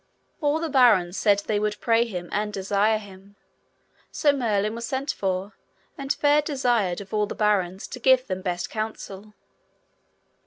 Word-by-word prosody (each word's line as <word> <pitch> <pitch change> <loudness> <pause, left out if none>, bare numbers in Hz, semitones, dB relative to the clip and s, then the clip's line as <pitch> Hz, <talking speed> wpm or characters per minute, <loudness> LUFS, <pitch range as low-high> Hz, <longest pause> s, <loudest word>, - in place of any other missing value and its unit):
All 295 +1 +2
the 330 - -2
barons 225 - +4
said 205 -1 +2
they 210 -1 0
would 210 0 -2
pray 230 0 +2
him 180 -6 -6
and 210 0 -1
desire 205 +2 +1
him. 200 -1 -13 0.8
So 290 -2 +2
Merlin 215 -5 0
was 235 +1 -6
sent 265 +4 -2
for, 190 +1 -3 0.4
and 275 -1 -4
fair 295 +1 +3
desired 245 - 0
of 195 +1 -12
all 210 -1 +1
the - - -6
barons 195 -3 0
to 250 - -7
give 260 +1 +4
them 190 -4 -4
best 175 -2 -3
counsel. 215 -2 -6
210 Hz, 160 wpm, -25 LUFS, 195-250 Hz, 0.8 s, barons